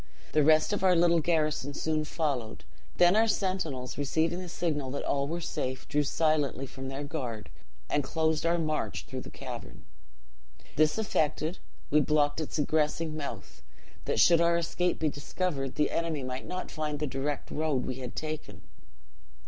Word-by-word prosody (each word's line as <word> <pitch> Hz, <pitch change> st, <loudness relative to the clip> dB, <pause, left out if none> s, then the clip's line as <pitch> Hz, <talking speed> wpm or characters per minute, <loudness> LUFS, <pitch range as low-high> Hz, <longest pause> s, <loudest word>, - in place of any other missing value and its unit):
The 155 Hz, -, +4 dB
rest 155 Hz, +5 st, +5 dB
of 205 Hz, -, -1 dB
our 185 Hz, -1 st, +5 dB
little 170 Hz, 0 st, +5 dB
garrison 155 Hz, -3 st, 0 dB
soon 155 Hz, 0 st, 0 dB
followed; 140 Hz, -9 st, -2 dB, 0.3 s
then 175 Hz, +2 st, +6 dB
our 225 Hz, +1 st, +5 dB
sentinels, 185 Hz, -, -1 dB
receiving 160 Hz, +5 st, +1 dB
the 180 Hz, -1 st, -6 dB
signal 150 Hz, -6 st, -1 dB
that 140 Hz, -, -3 dB
all 140 Hz, 0 st, 0 dB
were 170 Hz, +3 st, -2 dB
safe, 130 Hz, -5 st, -3 dB
drew 150 Hz, -, +2 dB
silently 150 Hz, -2 st, +1 dB
from 135 Hz, 0 st, -7 dB
their 135 Hz, +2 st, -4 dB
guard, 125 Hz, -8 st, -5 dB, 0.4 s
and 145 Hz, -, +1 dB
closed 160 Hz, +3 st, 0 dB
our 170 Hz, +1 st, +3 dB
march 155 Hz, -2 st, -2 dB
through -, -, -5 dB
the -, -, -9 dB
cavern. -, -, -8 dB, 0.9 s
"This 155 Hz, +3 st, +3 dB
effected, 160 Hz, -5 st, 0 dB, 0.3 s
we 150 Hz, -, +6 dB
blocked 145 Hz, +1 st, +2 dB
up -, -, -1 dB
its -, -, -4 dB
egressing 155 Hz, +1 st, +1 dB
mouth, 140 Hz, -, -6 dB, 0.4 s
that, -, -, 0 dB
should 170 Hz, -1 st, +6 dB
our 170 Hz, 0 st, +4 dB
escape 175 Hz, +1 st, 0 dB
be 160 Hz, -, +1 dB
discovered, 145 Hz, -2 st, -3 dB
the 150 Hz, -, +2 dB
enemy 165 Hz, -4 st, -1 dB
might 130 Hz, 0 st, -5 dB
not 185 Hz, 0 st, -4 dB
find 150 Hz, -2 st, -2 dB
the 150 Hz, -, -1 dB
direct 140 Hz, +1 st, -3 dB
road 150 Hz, -4 st, 0 dB
we 130 Hz, -, -3 dB
had 125 Hz, -2 st, -6 dB
taken. 155 Hz, 0 st, -5 dB
155 Hz, 170 wpm, -29 LUFS, 140-165 Hz, 0.9 s, then